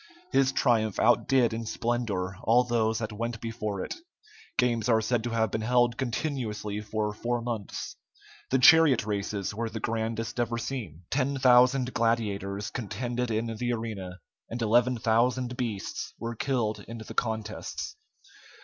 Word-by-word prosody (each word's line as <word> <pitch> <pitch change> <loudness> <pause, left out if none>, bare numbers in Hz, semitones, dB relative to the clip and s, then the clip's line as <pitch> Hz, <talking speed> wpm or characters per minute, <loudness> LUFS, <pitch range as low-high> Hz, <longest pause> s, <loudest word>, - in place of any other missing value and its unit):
His 135 0 +4
triumph 115 -6 +2
outdid 120 +1 +4
in 115 0 -4
splendor 110 -6 -1
all 115 +4 +4
those 115 -2 +1
that 110 -1 -3
went 115 +2 -3
before 110 -4 -3
it. - - -4 0.6
Games 120 -2 +2
are 110 -1 +5
said 110 +1 0
to - - -1
have 110 -2 +1
been 110 - -1
held 120 +1 +3
continuously 115 -5 -3
for 105 0 -2
four 120 +3 -1
months. 115 -4 -5 0.5
The 130 - +3
chariot 135 -2 +7
races 100 -1 -2
were 115 +2 -2
the 110 0 -5
grandest 115 +1 -2
ever 120 0 0
seen. 110 - -5
Ten 140 0 +1
thousand 125 0 +5
gladiators 105 -4 -1
contended 120 +2 -3
in 115 +1 -1
the 120 +1 -1
arena, 105 -6 -5 0.3
and 120 - -4
eleven 120 +3 +3
thousand 120 +3 +1
beasts 115 -6 -4
were 115 0 -4
killed 120 -4 -1
in 115 - -7
the 110 - -8
contests. 110 - -3
115 Hz, 150 wpm, -28 LUFS, 110-125 Hz, 0.6 s, chariot